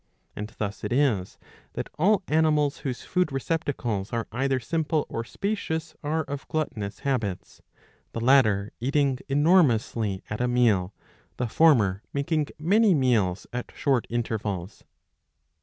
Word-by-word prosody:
^^ - - -46 0.3
And 105 +1 -5
thus 105 -1 -4
it - - -3
is 120 -8 +1 0.4
that - - -4
all 200 +4 +3
animals 150 -2 +2
whose 125 -3 -4
food 180 -4 0
receptacles 135 -8 -2
are 115 -1 -1
either 130 +3 0
simple 155 +3 -1
or 115 - -3
spacious 165 - -3
are 155 +2 0
of 140 -1 -6
gluttonous 110 -10 -3
habits, 110 -10 -3 0.5
the - - -3
latter 110 -5 +3
eating 135 +1 +1
enormously 125 - +2
at 105 +3 -4
a 125 - +2
meal, 110 -7 +2 0.5
the 125 - -1
former 110 - +4
making 150 +1 0
many 200 +5 +4
meals 110 -9 +1
at 125 0 -4
short 135 -5 +1
intervals. 110 -5 -3
130 Hz, 135 wpm, -26 LUFS, 110-155 Hz, 0.5 s, former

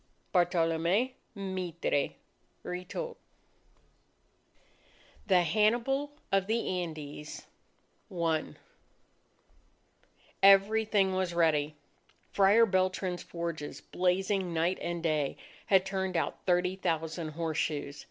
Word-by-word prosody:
Bartolome 175 +6 +2 0.2
Mitre 185 -7 -2 0.5
(Retold) 185 - -5 2.1
THE 185 -3 +5
HANNIBAL 235 - +2 0.2
OF 195 -1 +2
THE 215 -5 0
ANDES 150 -3 -7 0.7
I 165 -3 -1 1.9
Everything 200 0 +5
was 185 -2 -1
ready. 155 -3 +2 0.6
Friar 205 +4 +5
Beltran's 185 -2 0
forges, 170 -3 -5
blazing 185 0 0
night 170 +3 +1
and 170 -1 -3
day, 155 -4 0 0.3
had 190 -1 +4
turned 190 -2 -2
out 165 - -3
thirty 180 +1 +2
thousand 160 -3 -2
horseshoes. 150 -3 -2
180 Hz, 85 wpm, -30 LUFS, 165-195 Hz, 2.1 s, THE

